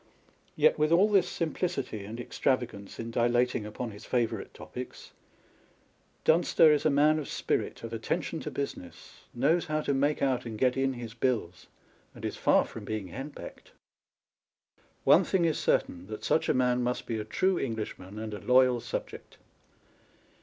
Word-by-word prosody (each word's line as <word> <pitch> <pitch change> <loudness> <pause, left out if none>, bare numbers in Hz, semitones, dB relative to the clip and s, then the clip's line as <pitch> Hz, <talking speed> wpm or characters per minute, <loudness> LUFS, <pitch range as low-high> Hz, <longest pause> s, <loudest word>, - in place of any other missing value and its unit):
Yet - - +4
with 155 +1 +2
all 180 +5 +6
this 185 -3 +4
simplicity 155 - -3
and 110 +4 -7
extravagance 120 -5 -2
in 115 0 -5
dilating 120 -1 +1
upon 110 +2 -5
his 105 +1 -12
favourite 120 -3 -1
topics, - - -9 1.1
Dunster 160 -1 +5
is 150 - +2
a - - +4
man 150 +2 +4
of 150 - -5
spirit, - - -2
of 115 0 -6
attention 160 +8 -2
to - - -5
business, 140 -11 -7
knows 155 +8 +2
how 155 0 -1
to 140 - 0
make 145 +2 +1
out 130 -3 +1
and 115 -2 -6
get 125 +2 +2
in 135 0 +1
his 120 -3 -7
bills, 115 -8 -2 0.5
and - - -8
is - - -3
far - - +3
from - - -9
being 105 -4 -4
henpecked. 135 - -9 1.3
One - - +6
thing 180 -3 +1
is 160 - +1
certain, 90 +1 0
that 110 +1 -7
such 160 - +1
a - - +4
man 125 -1 +2
must 125 0 -1
be 115 -2 -3
a - - -3
true 185 - +1
Englishman 105 -5 -5
and 110 0 -5
a 105 - -5
loyal 125 -1 +4
subject. - - -6
125 Hz, 165 wpm, -29 LUFS, 110-150 Hz, 1.3 s, all